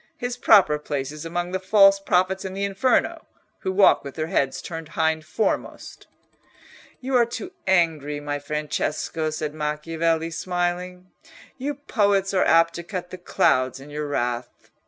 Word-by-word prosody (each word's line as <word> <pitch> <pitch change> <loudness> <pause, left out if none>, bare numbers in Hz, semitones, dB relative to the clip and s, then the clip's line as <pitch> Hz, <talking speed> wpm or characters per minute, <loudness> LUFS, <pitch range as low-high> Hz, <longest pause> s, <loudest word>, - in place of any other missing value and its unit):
His 245 -4 -3
proper 195 -11 +5
place 140 -2 -4
is 150 +1 -8
among 175 +1 -3
the 190 - -1
false 195 +1 +5
prophets 190 0 +1
in 190 -1 -6
the 200 - -2
Inferno, 200 +6 0 0.3
who 190 - -2
walk 195 +1 +5
with 140 -1 -8
their 155 - -2
heads 135 -4 0
turned 165 -2 -7
hind 160 -1 +1
foremost." 185 +7 -3 0.9
"You 260 +1 -2
are 240 -1 +5
too 300 +10 -6 0.2
angry, 160 -6 +1
my 145 0 -3
Francesco," 150 +2 -2
said 155 -1 -4
Macchiavelli, 160 +2 -1
smiling; 180 +1 -3 0.5
"you 285 +3 -3
poets 200 -8 +1
are 185 - +3
apt 165 0 +4
to 170 - -6
cut 180 -1 -6
the 185 - -8
clouds 130 -6 +1
in 140 +2 -12
your 150 0 -4
wrath. 120 -3 -3
170 Hz, 155 wpm, -24 LUFS, 150-190 Hz, 0.9 s, proper